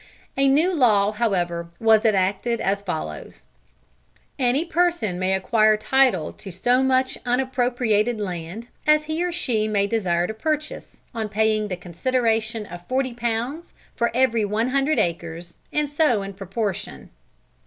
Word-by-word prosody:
A 275 Hz, 0 st, +3 dB
new 310 Hz, +7 st, +3 dB
law 215 Hz, -, +3 dB
however 175 Hz, -6 st, -1 dB
was 225 Hz, 0 st, +4 dB
enacted 205 Hz, +3 st, +1 dB
as 200 Hz, +1 st, 0 dB
follows: 80 Hz, -, -6 dB, 1.0 s
"Any 260 Hz, +5 st, +2 dB
person 340 Hz, -, 0 dB
may 185 Hz, +1 st, +1 dB
acquire 215 Hz, +2 st, +3 dB
title 225 Hz, -, +2 dB
to 195 Hz, -, -10 dB
so 245 Hz, +8 st, +1 dB
much 260 Hz, 0 st, +1 dB
unappropriated 245 Hz, -3 st, +1 dB
land, 185 Hz, +3 st, -5 dB, 0.2 s
as 305 Hz, 0 st, +5 dB
he 315 Hz, +3 st, -2 dB
or 355 Hz, -, -1 dB
she 245 Hz, -11 st, 0 dB
may 205 Hz, -2 st, +1 dB
desire 185 Hz, -5 st, 0 dB
to 220 Hz, -, -4 dB
purchase, 305 Hz, +6 st, -4 dB
on 220 Hz, -2 st, -3 dB
paying 215 Hz, 0 st, +1 dB
the 180 Hz, -3 st, -4 dB
consideration 225 Hz, +4 st, -1 dB
of 175 Hz, -1 st, -11 dB
forty 260 Hz, -1 st, -1 dB
pounds 240 Hz, +7 st, -3 dB, 0.2 s
for 235 Hz, -, +1 dB
every 235 Hz, -3 st, +2 dB
one 215 Hz, +4 st, 0 dB
hundred 275 Hz, +2 st, +1 dB
acres, 170 Hz, -3 st, -3 dB
and 300 Hz, 0 st, 0 dB
so 290 Hz, -8 st, +1 dB
in 195 Hz, 0 st, -6 dB
proportion." 195 Hz, -, -5 dB
225 Hz, 145 wpm, -23 LUFS, 195-260 Hz, 1.0 s, as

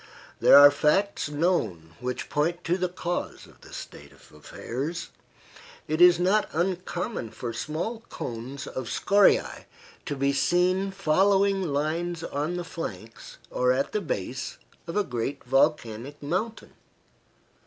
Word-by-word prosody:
There -, -, +8 dB
are 145 Hz, 0 st, +10 dB
facts 150 Hz, +5 st, +1 dB
known 145 Hz, -, -1 dB
which 125 Hz, 0 st, -4 dB
point 170 Hz, +4 st, -1 dB
to 175 Hz, -, +1 dB
the 180 Hz, -1 st, -1 dB
cause 175 Hz, 0 st, -4 dB
of -, -, -20 dB
this -, -, -11 dB
state -, -, -10 dB
of -, -, -20 dB
affairs. 135 Hz, -, -5 dB, 0.8 s
It 155 Hz, +2 st, -1 dB
is 175 Hz, -1 st, +8 dB
not 195 Hz, +4 st, +2 dB
uncommon 180 Hz, -, -2 dB
for 115 Hz, +1 st, -6 dB
small 170 Hz, -, -3 dB
cones 125 Hz, +4 st, -6 dB
of 130 Hz, -2 st, -5 dB
scoriae 205 Hz, -, +3 dB, 0.4 s
to 145 Hz, -, -2 dB
be 140 Hz, 0 st, +1 dB
seen 180 Hz, +6 st, +2 dB
following 195 Hz, +2 st, +2 dB
lines 165 Hz, +2 st, -2 dB
on 155 Hz, +5 st, -2 dB
the 175 Hz, -, -3 dB
flanks 115 Hz, -, -8 dB
or 125 Hz, 0 st, +2 dB
at 130 Hz, +2 st, 0 dB
the 210 Hz, -, -1 dB
base 130 Hz, -, -4 dB, 0.3 s
of 170 Hz, -, -3 dB
a 210 Hz, -, +3 dB
great 135 Hz, -1 st, -4 dB
volcanic 135 Hz, 0 st, 0 dB
mountain. 200 Hz, +10 st, -3 dB
155 Hz, 135 wpm, -26 LUFS, 135-180 Hz, 0.8 s, are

